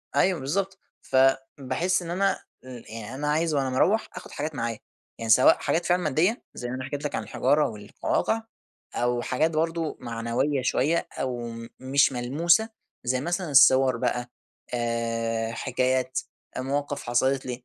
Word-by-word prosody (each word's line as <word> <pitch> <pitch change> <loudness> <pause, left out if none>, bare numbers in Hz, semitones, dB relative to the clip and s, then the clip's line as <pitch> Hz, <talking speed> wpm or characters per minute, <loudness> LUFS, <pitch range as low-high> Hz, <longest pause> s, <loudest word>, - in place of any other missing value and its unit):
أيوه 185 -4 +3
بالضبط 190 +8 -2 0.2
فباحس 135 +6 +1
إن 170 0 -6
أنا 195 +2 +1 0.3
إمم، 125 -2 -9
يعني 115 +2 -7
أنا 150 +2 -3
عايز 155 +1 +1
وأنا 135 -2 +1
مروّح 190 +12 +2
آخد - - -9
حاجات 150 0 -4
معايا، 115 -2 -3 0.4
يعني 115 -1 -5
سواء 130 +4 +7
حاجات 170 +1 0
فعلًا 180 0 +2
مادية 160 - +1
زي 120 - -5
ما 130 - -3
أنا 130 - -5
حكيت 145 +2 -5
لَك - - -2
عن 110 - -2
الحجارة 140 +7 +2
والقواقع، 110 - -1 0.5
أو 120 0 +1
حاجات 155 +7 +1
برضه 165 0 -1
معنوية 120 +4 -1
شوية 150 +6 +1
أو 125 -2 -1
م 115 0 -8
مش 135 +2 +3
ملموسة، 165 - +2 0.3
زي 125 +1 0
مثلًا 175 +1 -2
الصور 130 -2 +6
بقى 120 +1 -1 0.4
آآ 115 -1 -1
حكايات 130 +1 0 0.4
مواقف 140 +2 -2
حصلت 130 +3 +1
لي، 125 -1 -5
130 Hz, 155 wpm, -26 LUFS, 120-155 Hz, 0.5 s, سواء